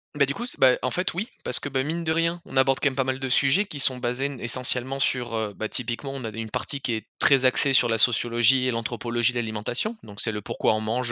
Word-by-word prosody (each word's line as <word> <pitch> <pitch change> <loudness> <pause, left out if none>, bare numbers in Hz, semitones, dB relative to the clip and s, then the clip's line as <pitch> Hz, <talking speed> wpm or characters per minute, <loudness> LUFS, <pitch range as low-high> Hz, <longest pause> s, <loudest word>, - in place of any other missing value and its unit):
Beh, 140 -1 +3
du 140 - -3
coup 240 - -6
s - - -4
bah, 130 -1 +5
en 130 - -1
fait 180 -2 -1
oui 200 +7 -3 0.2
parce 125 - +2
que, - - -5
bah, 130 -1 -1
mine 165 +3 -3
de 160 - +1
rien, 165 +1 0
on 135 - -10
aborde 130 0 +3
quand 145 - +2
même 130 - -1
pas 135 - +1
mal 130 0 -2
de 135 - -3
sujets 140 +11 +3
qui 145 -7 -4
sont 130 -2 +2
basés 125 +2 -2
n 140 -4 -8
essentiellement 130 +2 0
sur, 120 -3 -1
heu 110 -2 -2
bah, 110 - -4
typiquement 125 +3 -4
on 135 -3 -6
avait 110 0 -6
une 110 -1 -5
partie 140 - -3
qui 120 - -2
est 110 -1 -4
très 135 -2 +4
axée 135 +1 +3
sur 120 - +5
la 115 - +1
sociologie 120 +2 +4
et 130 - +1
l'anthropologie 120 +1 -1
de 120 - -2
l'alimentation. 120 - -3
Donc 105 -1 -8
c'est 110 - 0
le, 105 0 -5
pourquoi 110 - 0
on 110 - -1
mange, 120 +3 -2
130 Hz, 280 wpm, -25 LUFS, 115-135 Hz, 0.2 s, bah